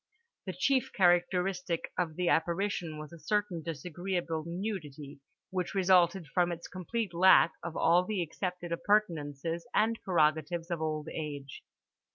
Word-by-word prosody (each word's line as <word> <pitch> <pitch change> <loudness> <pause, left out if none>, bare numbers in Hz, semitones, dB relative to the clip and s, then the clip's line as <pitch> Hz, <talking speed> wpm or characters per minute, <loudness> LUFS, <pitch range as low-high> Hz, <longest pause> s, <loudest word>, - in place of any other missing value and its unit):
The 185 - -2
chief 260 +8 +1
characteristic 180 -1 +1
of 165 -4 -1
the 180 +1 -1
apparition 170 -1 0
was 155 +2 -9
a 170 - -11
certain 205 -3 -1
disagreeable 165 +1 -3
nudity 165 -7 -5 0.3
which 185 0 -3
resulted 185 -1 +4
from 175 +4 +1
its 170 0 -6
complete 190 +2 -4
lack 170 -3 +6
of 170 -1 -6
all 175 +2 +4
the 190 -1 -1
accepted 175 +1 -5
appurtenances 170 - 0
and 225 +1 +2
prerogatives 165 0 +1
of 170 -2 -2
old 155 -1 -2
age. 145 -3 -6
175 Hz, 135 wpm, -31 LUFS, 160-185 Hz, 0.3 s, lack